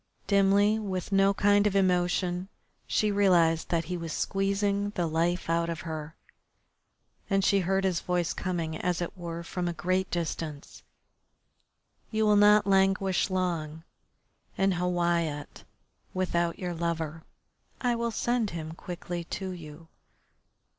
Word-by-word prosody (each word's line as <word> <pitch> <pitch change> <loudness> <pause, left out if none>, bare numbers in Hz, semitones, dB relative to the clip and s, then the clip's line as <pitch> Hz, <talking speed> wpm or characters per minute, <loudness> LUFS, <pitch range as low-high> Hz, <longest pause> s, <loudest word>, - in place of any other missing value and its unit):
Dimly, 200 +2 +4
with 190 -3 -4
no 195 0 +4
kind 205 +1 +3
of 200 - -1
emotion, 180 -1 +1 0.4
she 210 -1 +1
realised 175 -5 +3
that 170 -1 +1
he 180 +3 -4
was 165 -2 -5
squeezing 200 +3 0
the 175 - 0
life 170 +3 0
out 170 0 +1
of 165 0 -4
her 160 -1 -6 1.1
and 195 -1 +2
she 200 - +4
heard 190 +1 +1
his 185 -3 +1
voice 175 -2 -1
coming, 170 -4 -3
as 175 +1 -1
it 175 - -4
were, 170 -2 -6
from 175 +1 -3
a 175 - -1
great 185 +2 0
distance: 160 -3 -4 1.3
"You 220 -1 +1
will 210 -1 +5
not 210 0 +6
languish 195 0 +2
long 165 -4 -2 0.7
in 195 0 +3
Hawiyat 175 -4 -1 0.5
without 170 -2 0
your 180 -2 -3
lover. 165 -1 -3 0.6
I 245 -2 +1
will 235 0 -1
send 235 -1 0
him 160 -2 -6
quickly 175 +1 -6
to 190 +2 -4
you." 165 -2 -10
180 Hz, 135 wpm, -28 LUFS, 170-195 Hz, 1.3 s, not